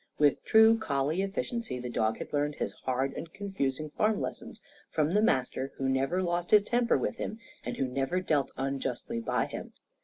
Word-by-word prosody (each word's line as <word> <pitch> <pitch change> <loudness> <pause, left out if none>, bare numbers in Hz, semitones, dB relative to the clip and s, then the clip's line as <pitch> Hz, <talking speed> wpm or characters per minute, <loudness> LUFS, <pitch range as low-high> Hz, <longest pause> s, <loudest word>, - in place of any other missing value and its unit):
With 145 -2 +3
true 220 +1 +6
collie 150 -3 0
efficiency, 200 - -2
the 125 0 -5
dog 110 -2 0
had - - -8
learned 145 0 +1
his - - -3
hard 130 +1 0
and 165 - -7
confusing 155 -8 -3
farm 215 +6 +1
lessons - - -5 0.3
from 155 +1 +1
the 210 - +4
master, 130 - +1
who 135 - -1
never 135 +8 +1
lost 175 0 -1
his 210 -1 +7
temper 240 +2 +2
with - - -2
him 215 - -4 0.3
and - - -4
who 135 - +1
never 135 +7 0
dealt 150 -7 +1
unjustly 135 -3 -2
by 115 - 0
him. - - -7
150 Hz, 185 wpm, -30 LUFS, 135-195 Hz, 0.3 s, his